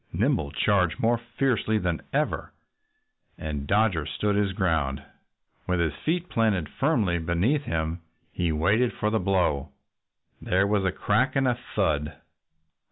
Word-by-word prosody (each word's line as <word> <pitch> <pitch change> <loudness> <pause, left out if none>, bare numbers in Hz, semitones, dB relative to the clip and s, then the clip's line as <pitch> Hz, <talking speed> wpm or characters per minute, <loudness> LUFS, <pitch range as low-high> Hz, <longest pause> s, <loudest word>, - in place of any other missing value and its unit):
Nimble 75 -2 +1
charged 90 +1 +1
more 115 +1 +2
fiercely 120 -2 0
than 90 -5 -1
ever. - - -1 0.9
And 75 -2 -4
Dodger 100 -6 +2
stood 105 -1 -1
his 100 -1 +1
ground. 80 -8 0 0.6
With 90 -1 +1
his 80 -3 +1
feet 170 - -2
planted 105 - +1
firmly 110 - +1
beneath 90 - 0
him 80 +1 -2 0.3
he 85 -2 -1
waited 100 +11 +2
for 105 - -1
the 110 - +2
blow. 90 -7 +1 0.7
There 95 +2 +2
was 100 -1 +1
a 95 - +2
crack 105 +9 +1
and 135 -1 +2
a 125 - +3 0.2
thud. 75 -7 0
95 Hz, 140 wpm, -26 LUFS, 80-110 Hz, 0.9 s, a